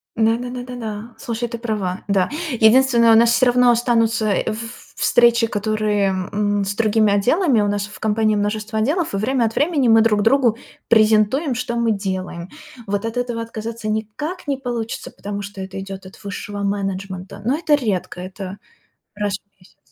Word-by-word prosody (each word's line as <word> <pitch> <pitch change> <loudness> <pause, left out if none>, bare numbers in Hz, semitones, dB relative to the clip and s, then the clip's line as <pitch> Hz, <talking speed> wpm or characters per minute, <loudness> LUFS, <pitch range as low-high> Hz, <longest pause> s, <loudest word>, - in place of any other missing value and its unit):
Да 225 0 +3
да 245 +1 -5
да 250 0 -6
да, 225 0 -6
слушай, 235 0 -3
ты 235 0 -6
права. 210 -6 -3
Да, 195 -2 +2 0.3
единственное, 235 0 +5
у - - +7
нас 230 +1 +5
всё 255 - +4
равно 245 0 +5
останутся 230 -2 +2 0.2
в - - +2
ф 225 +1 -8
встречи, 235 -1 +4
которые, 210 -1 0
м, 200 +2 -1
с 200 +1 -3
другими 215 -1 +3
отделами, 250 - +3
у 205 - +1
нас 205 0 -1
в 210 - -13
компании 215 0 +2
множество 215 +1 -2
отделов, 305 - 0
и - - 0
время 240 +4 +1
от 225 - -3
времени 295 -5 +2
мы 225 -1 +6
друг 215 -2 +3
другу 235 -1 +3 0.3
презентуем, 220 +6 +3
что 235 0 -3
мы 235 -1 +2
делаем. 185 -3 -4 0.4
Вот 205 0 -2
от 225 +1 -4
этого 245 -2 -2
отказаться 230 0 -6
никак 220 - -4
не 280 -1 0
получится, 240 -4 -4
потому 205 0 -6
что 200 -1 -8
это 190 0 -6
идёт 195 0 -8
от 190 - -13
высшего 200 0 -6
менеджмента, 195 -1 -4
но 260 +5 +1
это 315 -2 +3
редко, 205 -9 -2
это 185 +1 -7 0.6
раз 205 -1 -1
в 200 - -48
месяц. 180 0 -23
220 Hz, 180 wpm, -20 LUFS, 205-235 Hz, 0.6 s, у